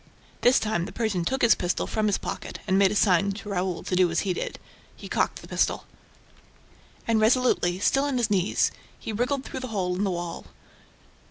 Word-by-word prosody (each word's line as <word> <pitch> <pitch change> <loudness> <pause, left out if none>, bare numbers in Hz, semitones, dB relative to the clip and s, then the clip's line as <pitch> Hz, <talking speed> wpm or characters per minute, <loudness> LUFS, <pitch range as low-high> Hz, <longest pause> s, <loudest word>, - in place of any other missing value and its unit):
This 245 +1 +5
time, 195 -6 -1
the 195 - -8
Persian 200 -4 -1
took 265 +6 -1
his 235 - +7
pistol 175 0 -1
from 215 -1 -1
his 205 - +2
pocket - - -6
and 190 - +2
made 195 0 +5
a 210 - -3
sign 200 -1 +3
to 205 +1 -8
Raoul 185 -2 -2
to 185 - -2
do 180 -1 +4
as 170 - 0
he 190 -3 -1
did. - - -4 0.4
He - - -10
cocked - - -1
the - - -11
pistol. - - 0 1.2
And, 225 -1 +2
resolutely, 220 -6 +3
still 270 +8 +2
on 280 -3 -1
his 230 -3 0
knees, 190 -2 +2 0.3
he 220 - -6
wiggled 250 +5 -1
through - - -6
the 255 - -5
hole 185 -5 -1
in 190 - -1
the 200 - +1
wall. 175 -2 -5
200 Hz, 205 wpm, -26 LUFS, 180-230 Hz, 1.2 s, his